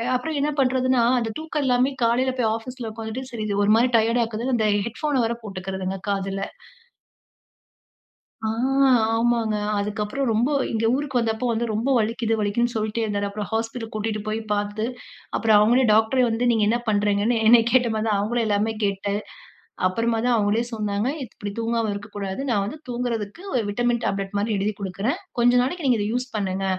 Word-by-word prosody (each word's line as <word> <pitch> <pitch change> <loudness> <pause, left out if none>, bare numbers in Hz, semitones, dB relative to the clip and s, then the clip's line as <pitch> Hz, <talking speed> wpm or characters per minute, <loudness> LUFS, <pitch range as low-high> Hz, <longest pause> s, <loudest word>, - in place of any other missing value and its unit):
அப்புறம் 305 +4 -2
என்ன 295 - +1
பண்றதுன்னா, 255 -1 +2 0.2
அந்த 225 -2 -2
தூக்கம் 315 -2 -3
இல்லாமயே 255 +2 +2
காலையில 255 +3 +2
போய் 220 -2 +2
ஆஃபீஸ்ல 230 0 -6
உக்காந்துட்டு, 225 +4 -6
சரி 220 -2 -4
இது 200 - -1
ஒரு 210 - +4
மாரி 245 +2 +3
டயர்ட் 230 +2 +2
ஆக்குதுன்னு, 230 +3 -2
அந்த 220 -1 +2 0.2
ஹெட்ஃபோன 270 +3 -1
வேற 235 +1 -1
போட்டுக்கிறதுங்க, 190 -1 -4
காதுல. 195 0 -2 2.0
ஆ - - +1 0.7
ஆமாங்க. 230 -2 +1 0.2
அதுக்கப்புறம் 210 +6 -2
ரொம்ப 235 +6 +2 0.2
இங்க 225 0 0
ஊருக்கு 275 -3 -1
வந்தப்போ 225 +1 -1
வந்து 230 +1 0
ரொம்ப 220 +4 -1
வலிக்குது 225 +1 0
வலிக்குதுன்னு 235 +4 0
சொல்லிட்டே 220 0 -2
இருந்தாரு. 205 -2 -1
அப்புறம் 205 +1 -5
ஹாஸ்பிட்டல் 225 +1 -3
கூட்டிட்டு 215 0 -2
போய் 215 +1 -1
பாத்து, 205 +1 -1 0.5
அப்புறம் 220 -2 +3
அவுங்களே 240 +5 +4
டாக்டரே 225 +4 +3
வந்து, 230 +2 0
நீங்க 225 -2 +2
என்னா 235 +3 +2
பண்றீங்கன்னு? 205 +2 +2
என்னய 230 0 +7
கேட்ட 250 -1 +4
மாதிரி 220 +1 -1
தான், 205 -2 +2
அவங்களையும் 230 +3 0
எல்லாமே 210 +1 +1
கேட்டு, 200 0 -1 0.7
அப்புறமா 230 +5 0
தான் 250 - +3
அவுங்களே 210 +1 +2
சொன்னாங்க. 210 +1 -1 0.2
"இப்டி 205 -3 -7
தூங்காம 230 -1 0
இருக்கக்கூடாது. 205 +1 -5
நான் 205 -4 +2
வந்து 220 +10 -6
தூங்குறதுக்கு 240 - -3
ஒரு 240 - +2
விட்டமின் 240 +3 0
டேப்லெட் 195 0 -2
மாரி 210 +3 -1
எழுதிக் 200 +1 -2
குடுக்குறேன். 195 +6 -2 0.2
கொஞ்ச 240 +1 +5
நாளைக்கு 305 +5 -3
நீங்க 245 -4 +3
இதை 205 - -1
யூஸ் 250 +1 -2
பண்ணுங்க. 195 -2 -2
225 Hz, 170 wpm, -23 LUFS, 205-245 Hz, 2.0 s, என்னய